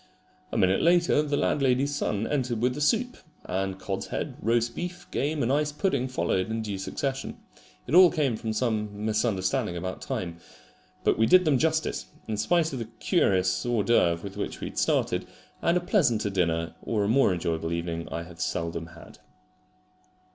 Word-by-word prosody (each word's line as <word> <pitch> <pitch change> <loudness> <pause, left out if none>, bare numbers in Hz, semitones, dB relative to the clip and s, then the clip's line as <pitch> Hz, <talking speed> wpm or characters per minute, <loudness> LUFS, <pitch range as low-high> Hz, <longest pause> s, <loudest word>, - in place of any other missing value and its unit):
A - - -2
minute 95 -2 +3
later 170 -2 +4
the 145 -1 -1
landlady's 135 0 +1
son 105 -6 -1
entered 125 -5 -1
with 125 +2 +1
the 150 - -5
soup; 245 - +1 0.3
and 95 +1 -2
cod's 95 0 -4
head, - - -4
roast 115 +2 +1
beef, 175 0 -5
game 145 +1 -1
and 125 +3 +1
ice 150 +1 +1
pudding 150 -5 0
followed 95 -5 -1
in 110 0 -2
due 100 -3 -4
succession. 135 +7 -3 0.5
It 130 - -6
all 180 0 +9
came 145 -9 0
from 110 0 -4
some 105 -2 -2
misunderstanding 105 -5 0
about 95 +2 -5
time. 85 -2 -4 0.6
But - - +2
we 115 - +4
did 185 0 +6
them 145 -5 +3
justice, 160 +1 0 0.2
in 110 -1 -2
spite 160 +8 +1
of 130 - -3
the 115 - -3
curious 95 - +1
hors 120 -3 +1
d'oeuvre 85 -8 +2
with 100 -1 -7
which - - -4
we - - -4
had - - -4
started; - - +1 0.3
and 170 +1 +3
a - - +2
pleasanter 135 - +1
dinner 85 -3 0
or 105 -3 -1
a - - 0
more 120 -1 +4
enjoyable 80 -2 -2
evening 85 0 -3
I 85 - -3
have 85 -1 -11
seldom 85 0 -2
had. 85 0 -14
115 Hz, 180 wpm, -27 LUFS, 95-145 Hz, 0.6 s, all